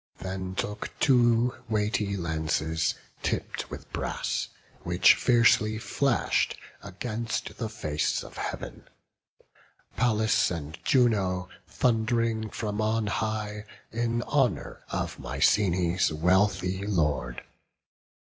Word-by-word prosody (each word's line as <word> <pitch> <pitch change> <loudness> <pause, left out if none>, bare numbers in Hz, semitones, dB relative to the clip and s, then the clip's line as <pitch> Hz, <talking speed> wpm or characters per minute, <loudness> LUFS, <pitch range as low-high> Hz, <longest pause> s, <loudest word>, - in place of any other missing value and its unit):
Then 95 0 -5
took 105 +2 -3
two 120 -3 +4 0.2
weighty 105 -2 0
lances, 80 -1 -1 0.3
tipp'd - - -2
with - - -10
brass, - - -2 0.3
Which - - +5
fiercely 115 -3 +4
flash'd 120 +2 +1 0.3
against 115 +4 -4
the 115 -2 -2
face 80 -9 -1
of - - -12
Heav'n: - - -5 1.1
Pallas 110 -3 +2
and 80 -3 -5
Juno 95 -8 +2 0.2
thund'ring 115 -2 +1
from 105 0 -3
on 110 +1 +1
high 105 0 -2 0.3
In 115 +1 -1
honour 125 - 0
of - - -3
Mycenæ's 90 -4 +2
wealthy 95 +3 +2
lord. 75 -10 0
105 Hz, 95 wpm, -28 LUFS, 90-115 Hz, 1.1 s, Which